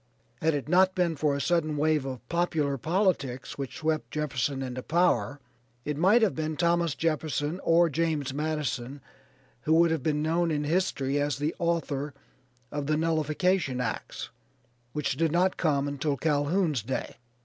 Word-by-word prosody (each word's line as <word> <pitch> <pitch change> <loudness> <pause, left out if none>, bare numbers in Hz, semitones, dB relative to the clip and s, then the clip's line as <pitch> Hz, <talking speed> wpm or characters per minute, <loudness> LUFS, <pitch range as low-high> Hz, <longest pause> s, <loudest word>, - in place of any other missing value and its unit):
Had 160 -1 +2
it 145 - -3
not 185 +3 +4
been 175 -3 +1
for 145 0 +1
a - - -2
sudden 155 -1 +1
wave 155 -1 +2
of 130 -3 -6
popular 160 -5 0
politics 155 - -1
which 135 -2 -5
swept 155 -1 -1
Jefferson 140 -3 -2
into 130 -1 -4
power 165 -2 +1 0.5
it 150 - -2
might 195 +10 +4
have 210 - +3
been 155 -1 -3
Thomas 170 -3 +2
Jefferson 155 0 -1
or 170 +1 +5
James 155 -3 -1
Madison 145 -3 -2 0.6
who 155 +6 +2
would 170 0 +5
have 160 -3 0
been 150 +1 0
known 165 +2 +1
in 150 -2 0
history 145 -4 0
as 145 0 0
the 150 +3 -1
author 150 -5 -1 0.6
of 145 -1 -3
the 155 0 +2
Nullification 160 -2 +1
Acts 120 -3 -4 0.6
which 145 -2 -2
did 165 0 +2
not 180 +3 +2
come 145 -4 +1
until 145 0 -1
Calhoun's 150 - +1
day. 130 +5 -4
155 Hz, 160 wpm, -28 LUFS, 140-170 Hz, 0.6 s, or